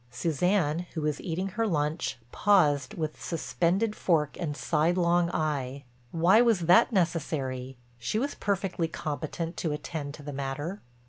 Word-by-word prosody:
Suzanne, 165 +5 0
who 160 - -1
was 150 -1 -1
eating 185 +3 -2
her 225 +4 -1
lunch, 150 -4 -1
paused 150 -10 +3
with 155 -2 -4
suspended 180 +5 0
fork 155 -5 +1
and 155 -4 -3
sidelong 170 +2 +2
eye;—why 140 - +1
was 230 -6 +3
that 175 +7 +5
necessary, 140 - -1 0.2
she 120 - -1
was 280 +5 -1
perfectly 195 -4 -1
competent 160 +2 -4
to 160 - -1
attend 150 -1 -5
to 145 - -12
the 145 0 -6
matter. 140 +8 -4
160 Hz, 135 wpm, -28 LUFS, 145-180 Hz, 0.2 s, that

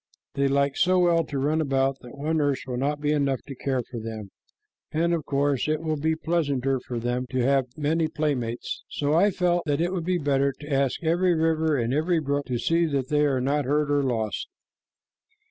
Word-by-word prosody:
They 140 0 +1
like 140 0 +1
so 185 0 +3
well 170 -2 +3
to 145 - -5
run 150 +4 +1
about 135 -2 +1
that 125 +2 -12
one 155 +3 -1
nurse 145 -3 0
will 125 -2 -4
not 145 +4 -1
be 150 0 +1
enough 140 -3 0
to 140 - -8
care 130 -1 -2
for 115 - -7
them, 110 -3 -7 0.6
and 170 +2 +1
of 165 -2 -1
course 140 -1 +1
it 155 0 +1
will 160 -1 -1
be 160 +2 0
pleasanter 140 -6 0
for 125 0 -6
them 120 +2 -2
to 130 - -4
have 135 0 +3
many 155 +2 +1
playmates. 140 -7 -2
So 145 0 -1
I 185 +6 +5
felt 175 -2 +1
that 145 0 +1
it 175 +2 0
would 175 -3 -3
be 180 0 +1
better 140 -3 +1
to 145 0 -5
ask 135 +3 0
every 175 +2 +2
river 160 -1 +1
and 120 0 0
every 160 +4 +2
brook 145 -1 -2
to 125 - -1
see 165 +7 +2
that 140 -4 -2
they 150 0 +3
are 135 -2 +1
not 140 +2 0
hurt 145 +2 +1
or 145 0 +3
lost." 115 -6 -2
145 Hz, 215 wpm, -25 LUFS, 135-160 Hz, 0.6 s, I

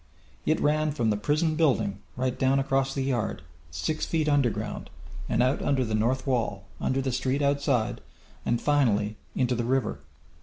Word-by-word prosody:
It 155 - +3
ran 155 +1 +2
from 120 -7 +1
the - - +2
prison 155 +8 +1
building, 115 -11 +2 0.2
right 130 0 -1
down 135 +1 +2
across 135 0 +1
the 135 - -2
yard, 120 - -1 0.3
six 75 - -2
feet 160 -2 0
under 145 -4 +4
ground, 105 -1 -5 0.4
and 115 - +3
out 130 +2 +1
under 130 -3 +1
the 110 - -3
north 120 +5 +1
wall, 125 -5 -1
under 135 +1 0
the 130 - 0
street 130 +3 0
outside, 135 -5 +1 0.4
and 120 0 +1
finally 110 -8 +2 0.2
into 125 -1 +1
the 120 -1 -1
river. 130 -1 0
130 Hz, 175 wpm, -27 LUFS, 115-140 Hz, 0.4 s, under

